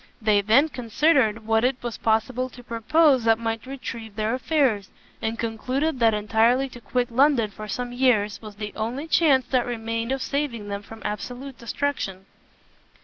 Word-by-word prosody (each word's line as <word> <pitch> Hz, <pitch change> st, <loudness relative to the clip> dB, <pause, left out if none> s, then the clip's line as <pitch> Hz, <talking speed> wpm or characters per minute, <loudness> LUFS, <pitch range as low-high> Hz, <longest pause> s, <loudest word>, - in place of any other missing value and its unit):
They 215 Hz, -2 st, +3 dB
then 225 Hz, +9 st, +4 dB
considered 245 Hz, -3 st, +1 dB
what 225 Hz, 0 st, +2 dB
it 255 Hz, +1 st, +2 dB
was 240 Hz, -2 st, -4 dB
possible 245 Hz, +3 st, 0 dB
to 245 Hz, 0 st, -13 dB
propose 255 Hz, +4 st, +3 dB
that 225 Hz, -1 st, +5 dB
might 225 Hz, +1 st, -3 dB
retrieve 230 Hz, -5 st, -7 dB
their 215 Hz, +1 st, -1 dB
affairs, 255 Hz, -, +1 dB, 0.3 s
and 225 Hz, 0 st, -2 dB
concluded 255 Hz, +6 st, -2 dB
that 225 Hz, -2 st, +4 dB
entirely 230 Hz, +5 st, +2 dB
to 245 Hz, -1 st, -12 dB
quit 245 Hz, +1 st, -1 dB
London 250 Hz, -4 st, +3 dB
for 215 Hz, +1 st, -8 dB
some 245 Hz, +4 st, -4 dB
years, 220 Hz, -5 st, +2 dB
was 215 Hz, -2 st, -10 dB
the 210 Hz, 0 st, -6 dB
only 240 Hz, +8 st, -3 dB
chance 290 Hz, -5 st, +4 dB
that 250 Hz, -2 st, +1 dB
remained 230 Hz, 0 st, -3 dB
of 270 Hz, -1 st, -1 dB
saving 260 Hz, -8 st, -3 dB
them 200 Hz, 0 st, -4 dB
from 220 Hz, +2 st, -12 dB
absolute 245 Hz, +5 st, -5 dB
destruction. 235 Hz, -7 st, -3 dB
235 Hz, 165 wpm, -24 LUFS, 220-260 Hz, 0.3 s, that